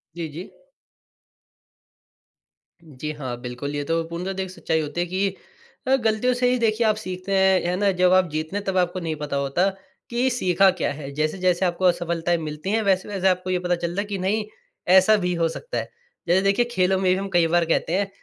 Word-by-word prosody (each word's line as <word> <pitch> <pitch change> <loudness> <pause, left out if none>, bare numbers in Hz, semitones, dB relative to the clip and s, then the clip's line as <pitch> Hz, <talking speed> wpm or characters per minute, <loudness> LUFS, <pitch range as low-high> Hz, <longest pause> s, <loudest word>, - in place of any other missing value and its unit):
जी, 170 -1 -4
जी। 165 +6 -8 2.3
जी 150 -1 -6
हाँ, 135 -5 -5
बिल्कुल 125 +4 -5
ये 145 - -2
तो 165 +3 0
पूर्णतः 175 +3 -4
द 190 - -7
एक 190 -1 -3
सच्चाई 160 -3 -1
होती 155 +3 -3
है - - 0
कि 190 +2 -1 0.5
अ, 265 - +5
गलतियों 230 0 +1
से 250 0 +1
ही 250 - +2
देखिए 225 0 +1
आप 215 - +3
सीखते 185 -2 -6
हैं, 190 -1 +4
है 175 +1 0
ना 200 0 +2
जब 180 0 +4
आप 185 -2 +4
जीतते 155 +4 -4
हैं, 205 - -2
तब 190 -1 -1
आपको 180 0 +1
नहीं 165 -3 -3
पता 150 -1 -4
होता 140 +8 +1 0.4
कि 245 +2 +1
सीखा 195 -6 +3
क्या - - 0
है। 140 -1 -8
जैसे-जैसे 175 +5 0
आपको 180 +1 -1
असफलताएँ 170 -1 +1
मिलती 155 +2 -5
हैं 220 +1 +2
वैसे-वैसे 190 0 +1
आपको 185 0 +1
ये 185 -1 +1
पता 180 0 0
चलता 175 +3 -2
है - - -5
कि 205 -1 -3
नहीं 210 +4 0 0.5
ऐसा 190 +3 +6
भी 180 0 0
हो 165 -1 +1
सकता 480 - -6
है। - - -3 0.4
जैसे 175 +2 +4
देखिए 200 +5 +2
खेलों 190 -3 +2
में 185 -1 +2
भी - - +3
हम 195 0 -4
कई 170 -1 +4
बार 170 +1 +2
कहते 165 0 0
हैं 200 0 0
180 Hz, 215 wpm, -23 LUFS, 165-195 Hz, 2.3 s, ऐसा